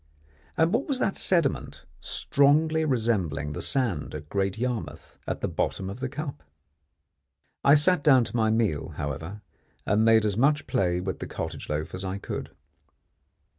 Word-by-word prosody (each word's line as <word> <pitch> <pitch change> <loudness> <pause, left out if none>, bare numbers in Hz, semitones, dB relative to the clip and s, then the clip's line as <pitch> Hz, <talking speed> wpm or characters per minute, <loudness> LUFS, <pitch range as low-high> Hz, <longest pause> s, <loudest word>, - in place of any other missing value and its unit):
And 165 +3 +3
what 250 +5 +1
was 275 -4 +1
that 195 - 0
sediment, 170 - 0
strongly 155 +3 +2
resembling 95 - 0
the - - -5
sand 110 - -1
at 75 0 -8
Great 95 0 -1
Yarmouth, 125 -1 -4
at - - -3
the - - 0
bottom 95 0 -2
of 105 - -8
the 130 0 -3
cup? 145 - -6 1.2
I 140 - +7
sat 155 +1 +3
down 130 -5 +6
to 115 - -7
my 110 -2 +2
meal, 110 -9 0
however, 80 +9 -5 0.4
and 105 +3 +2
made 110 -1 +5
as 105 -2 0
much 145 +3 +3
play 90 -2 +1
with 95 0 -4
the - - -5
cottage - - -6
loaf 75 +1 -3
as 90 +1 -5
I 95 +1 -3
could. 100 - -5
115 Hz, 165 wpm, -26 LUFS, 95-145 Hz, 1.2 s, I